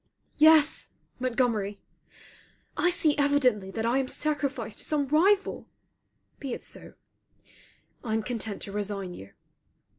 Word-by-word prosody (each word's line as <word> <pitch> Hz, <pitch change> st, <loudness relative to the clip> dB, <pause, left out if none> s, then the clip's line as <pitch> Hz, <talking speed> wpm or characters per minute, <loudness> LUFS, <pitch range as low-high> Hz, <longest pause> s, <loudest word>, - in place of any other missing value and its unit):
Yes, 310 Hz, 0 st, +5 dB, 0.3 s
Montgomery! 230 Hz, -5 st, 0 dB, 1.0 s
I 355 Hz, -, +2 dB
see 320 Hz, -4 st, +3 dB
evidently 255 Hz, -9 st, +2 dB
that 220 Hz, +3 st, -3 dB
I 240 Hz, +3 st, +2 dB
am 265 Hz, -, -1 dB
sacrificed 275 Hz, -8 st, -2 dB
to -, -, -6 dB
some 290 Hz, -2 st, 0 dB
rival. 385 Hz, +7 st, +2 dB, 0.7 s
Be 270 Hz, -4 st, -4 dB
it -, -, -7 dB
so. -, -, -7 dB, 1.1 s
I 220 Hz, -3 st, -1 dB
am 220 Hz, -, -1 dB
content 220 Hz, -3 st, -4 dB
to 200 Hz, -, -7 dB
resign 200 Hz, -2 st, -3 dB
you. 100 Hz, -, -11 dB
250 Hz, 125 wpm, -27 LUFS, 210-290 Hz, 1.1 s, Yes